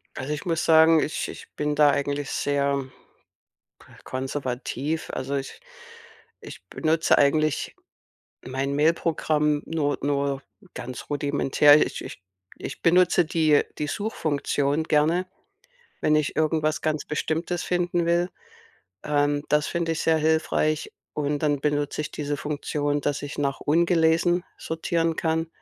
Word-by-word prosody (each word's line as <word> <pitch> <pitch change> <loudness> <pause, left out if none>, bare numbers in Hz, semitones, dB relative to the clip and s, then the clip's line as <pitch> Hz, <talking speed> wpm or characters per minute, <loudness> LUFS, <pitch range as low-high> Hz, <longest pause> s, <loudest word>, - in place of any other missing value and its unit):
Also, 135 +3 -3
ich 150 - -6
muss 165 -2 0
sagen, 160 0 +6
ich 150 - -2
ich - - -10
bin 150 0 -1
da 150 0 +6
eigentlich 140 0 -2
sehr 140 -1 0 1.2
konservativ. 130 +3 -3
Also, 135 +2 -3
ich 135 -1 -6 0.8
ich - - -11
benutze 160 0 +2
eigentlich 155 +1 +1 0.7
mein 135 +2 -2
Mail-Programm 150 -1 +1
nur 145 -3 -1
nur 140 -1 -1 0.3
ganz 125 0 -7
rudimentär. 145 0 +4
Ich - - -6
ich - - -9 0.4
ich - - -7
benutze 175 0 +4
die 155 -2 +3 0.2
die 150 - -1
Suchfunktion 150 -6 -1
gerne, 160 +4 +2 0.8
wenn 155 - +3
ich 150 -1 0
irgendwas 155 0 +1
ganz 155 -1 -1
Bestimmtes 165 +3 -2
finden 175 -1 0
will. 170 +1 +2 0.7
Ähm, 145 0 +1
das 150 0 +2
finde 170 -1 -1
ich 160 - -3
sehr 160 -1 +3
hilfreich 155 -1 +1 0.2
und 145 0 -1
dann 145 -2 +1
benutze 145 +1 -1
ich 150 - -6
diese 145 -1 -3
Funktion, 145 0 -2
dass 145 0 -1
ich 145 0 -7
nach 140 -1 -1
ungelesen 170 +2 +2
sortieren 165 0 -1
kann. 160 0 0
150 Hz, 130 wpm, -25 LUFS, 145-160 Hz, 1.2 s, sagen